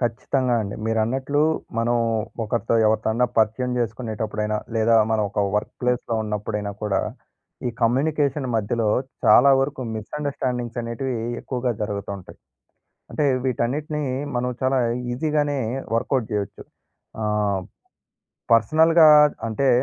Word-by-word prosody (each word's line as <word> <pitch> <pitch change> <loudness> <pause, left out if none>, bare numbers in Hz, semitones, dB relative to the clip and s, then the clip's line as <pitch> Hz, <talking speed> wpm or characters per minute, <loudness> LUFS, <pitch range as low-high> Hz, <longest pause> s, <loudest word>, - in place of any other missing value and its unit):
ఖచ్చితంగా 125 +1 0
అండి. 100 0 -5
మీరన్నట్లు 130 +6 0 0.4
మనం 120 +1 +2 0.5
ఒకరితో 115 +1 -1
ఎవరితోన్నా 110 +3 +2
పరిచయం 115 +3 +1
చేసుకునేటప్పుడైనా 110 -2 -2 0.2
లేదా 115 +1 +3 0.2
మనం 110 -1 +2
ఒక 105 - -1 0.2
వర్క్ 105 - -2
ప్లేస్‌లో 125 -1 0
ఉన్నప్పుడైనా 105 -1 -3
కూడా, 100 -2 +1 0.7
ఈ - - 0
కమ్యూనికేషన్ 140 +3 +1
మధ్యలో 110 +1 0 0.4
చాలా 140 +3 +7
వరకు 135 0 -2
మిస్‌అండర్‌స్టాండింగ్స్ 125 0 -3
అనేటివి 120 +2 -3 0.2
ఎక్కువగా 125 -1 -2
జరుగుతూంటాయి. 100 -2 -5 0.7
అంటే 150 - 0 0.2
వీటన్నిటిని 145 +5 -1 0.3
మనం 125 +1 0
చాలా 130 +1 +2 0.3
ఈజీగానే 145 +1 0 0.4
వర్కౌట్ 125 0 0
చేయొచ్చు. 100 -2 -3 0.6
ఆహ్, 105 -2 0 0.9
పర్సనల్‌గా 160 +8 +5 0.4
అంటే, 135 +5 +1
120 Hz, 105 wpm, -23 LUFS, 110-135 Hz, 0.9 s, చాలా